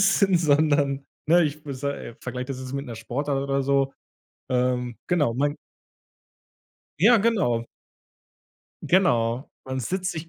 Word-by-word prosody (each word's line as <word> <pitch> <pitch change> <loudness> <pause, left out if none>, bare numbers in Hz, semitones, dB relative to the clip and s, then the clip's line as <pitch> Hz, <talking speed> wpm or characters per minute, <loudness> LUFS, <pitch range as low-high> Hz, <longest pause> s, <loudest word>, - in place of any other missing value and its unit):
essen, 195 -1 +4
sondern, 145 -3 +2 0.2
ne, 175 +1 +6
ich 150 -1 -2
v 150 -2 -7
se 140 +2 -2
äh, 115 - -8
vergleiche 125 0 -5
das 135 -2 -5
jetzt 130 0 -7
mit 140 0 -3
'ner 115 -4 -7
Sportart 135 +5 -2
oder 140 0 0
so, 135 0 +1 0.6
ähm, 125 -2 0
genau, 145 -10 +1
man 145 +3 0 1.4
Ja, 225 +8 +7
genau. 195 - +1 1.2
Genau, 125 -9 +2
man 130 0 -3
sitzt 185 - -2
sich 165 0 -7
140 Hz, 140 wpm, -25 LUFS, 125-165 Hz, 1.4 s, Ja